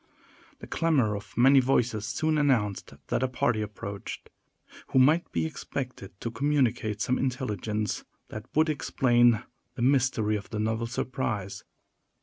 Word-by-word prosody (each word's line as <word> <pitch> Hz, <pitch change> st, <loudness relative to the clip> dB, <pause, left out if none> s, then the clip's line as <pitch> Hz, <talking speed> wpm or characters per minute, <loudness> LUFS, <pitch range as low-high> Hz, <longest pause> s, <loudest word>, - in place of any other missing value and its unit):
The -, -, -10 dB
clamor 135 Hz, -11 st, +1 dB
of 105 Hz, -, -9 dB
many 135 Hz, +3 st, +7 dB
voices 120 Hz, -5 st, +1 dB
soon 155 Hz, +7 st, 0 dB
announced 115 Hz, -9 st, 0 dB
that -, -, 0 dB
a 130 Hz, -, +2 dB
party 115 Hz, -3 st, 0 dB
approached, 100 Hz, -1 st, -7 dB, 0.6 s
who -, -, -1 dB
might 150 Hz, +7 st, +4 dB
be -, -, 0 dB
expected 125 Hz, -, -6 dB
to 115 Hz, -, -3 dB
communicate 115 Hz, -5 st, 0 dB
some 125 Hz, -, +1 dB
intelligence 110 Hz, -5 st, -2 dB, 0.3 s
that 110 Hz, 0 st, -8 dB
would 155 Hz, +1 st, +4 dB
explain 120 Hz, -6 st, +3 dB, 0.3 s
the 120 Hz, -, -2 dB
mystery 125 Hz, -5 st, +2 dB
of 100 Hz, -, -10 dB
the 110 Hz, -, -4 dB
novel 110 Hz, +2 st, -1 dB
surprise. 105 Hz, -6 st, -3 dB
120 Hz, 135 wpm, -28 LUFS, 105-135 Hz, 0.6 s, many